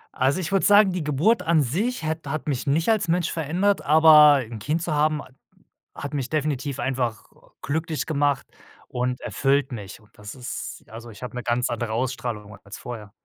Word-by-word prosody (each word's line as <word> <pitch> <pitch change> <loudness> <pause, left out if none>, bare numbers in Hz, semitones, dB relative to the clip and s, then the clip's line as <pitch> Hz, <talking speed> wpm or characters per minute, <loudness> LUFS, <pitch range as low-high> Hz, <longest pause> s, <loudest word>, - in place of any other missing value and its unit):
Also, 135 +8 +1
ich 175 0 -4
würde 195 -1 +2
sagen, 205 -1 +6
die 180 -3 -3
Geburt 160 - +2
an 160 -3 +3
sich 200 - -2
hat 160 -1 -3
hat 155 +2 -4
mich 135 -3 -2
nicht 155 +4 +1
als 215 -4 +2
Mensch 170 0 0
verändert, 175 +6 0
aber 150 -2 +7
'n 115 -2 -8
Kind 155 +10 -2
zu 170 -3 -2
haben 150 0 +1
ha - - -16 0.7
hat 145 +1 -6
mich 135 -3 -3
definitiv 145 -3 -2
einfach 125 -5 -2 0.4
glücklich 155 -1 -2
gemacht 145 -3 0 0.4
und 125 0 -2
erfüllt 140 -1 0
mich 105 -4 -8
und 105 - -24
das 105 0 -9
ist 125 -2 -7
also, 115 +2 -10
ich 110 +2 -12
habe 125 - -7
'ne 125 - -3
ganz 120 +1 0
andere 115 -1 -3
Ausstrahlung 115 -4 -3
als 100 - -10
vorher. 110 -4 -8
145 Hz, 190 wpm, -24 LUFS, 125-160 Hz, 0.7 s, aber